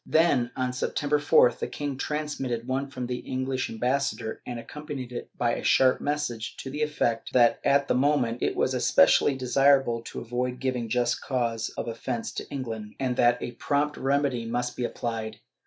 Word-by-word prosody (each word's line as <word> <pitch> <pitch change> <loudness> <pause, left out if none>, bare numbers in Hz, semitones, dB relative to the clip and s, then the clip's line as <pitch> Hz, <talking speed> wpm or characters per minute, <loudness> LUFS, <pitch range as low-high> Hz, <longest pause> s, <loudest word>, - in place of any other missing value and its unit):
Then, 150 -7 +3
on 130 -1 -1
September 145 +3 0
4th 125 -4 +4
the - - -2
king 145 -2 -4
transmitted 135 -5 -3
one 135 +2 -1
from 130 -2 -5
the 125 0 -3
English 130 +1 -2
ambassa 130 +4 0
dor, 110 -2 -6
and 120 - -4
accompanied 140 -1 -7
it 120 - -6
by 120 -1 +1
a - - -4
sharp 130 -1 +4
message 145 -7 -2
to 135 - -6
the 150 +2 -4
effect 130 -6 -1
that 120 -2 +5
at 140 0 +3
the - - +2
moment 130 -4 +1
it - - 0
was - - +1
especially 135 - +4
desirable 135 -2 +3
to - - -6
avoid 125 +1 -3
giving 125 -3 -2
just 120 +1 +1
cause 115 -3 -1
of - - -3
offence 115 0 -3
to - - -6
England, 115 -6 -5
and 130 -2 0
that 120 0 +4
a - - -4
prompt 145 +4 0
remedy 135 -3 0
must 120 +2 -2
be 125 - -3
applied. 115 -3 -4
125 Hz, 185 wpm, -27 LUFS, 120-140 Hz, -, that